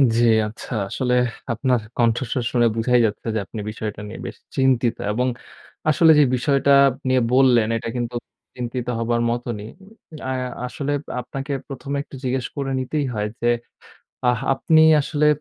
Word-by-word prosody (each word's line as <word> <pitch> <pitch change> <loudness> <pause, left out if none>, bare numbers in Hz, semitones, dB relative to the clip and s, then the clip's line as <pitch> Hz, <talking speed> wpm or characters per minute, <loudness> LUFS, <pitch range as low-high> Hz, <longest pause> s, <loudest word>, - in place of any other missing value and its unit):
জ্বী, 120 +1 +4 0.2
আচ্ছা। 115 +3 -8 0.2
আসলে 125 +2 -1 0.4
আপনার 125 +2 +1 0.2
কণ্ঠস্বর 120 +1 +1
শুনে 120 -1 +3
বুঝাই 125 +2 +3
যাচ্ছে। 110 +2 -3
যে - - +1
আপনি 110 - -8
বিষয়টা 105 -1 -5
নিয়ে 105 - -8
বেশ - - -7 0.2
চিন্তিত 130 -3 +2 0.2
এবং 125 +4 0 0.6
আসলে 160 +2 +6
যে - - +7
বিষয়টা 140 +2 +2 0.4
নিয়ে 130 -1 +3
বললেন। 125 -4 +5
এটা 115 - -5
কিন্তু 120 0 -3 0.4
চিন্তিত 125 0 -4
হবার 120 0 0
মতনই। 120 -3 -4 0.6
আ - - -1 0.4
আসলে 140 +3 -4 0.3
আপনাকে 135 +3 -6 0.2
প্রথমে 140 0 -5
একটু 135 - -13
জিজ্ঞেস 130 -1 -1
করে 135 -1 -2
নিতেই 140 +3 -1
হয় 105 0 -1
যে, 120 - +2 0.8
আ - - +5 0.3
আপনি 155 +3 +3 0.2
আসলে 150 +1 0
125 Hz, 150 wpm, -22 LUFS, 115-135 Hz, 0.8 s, যে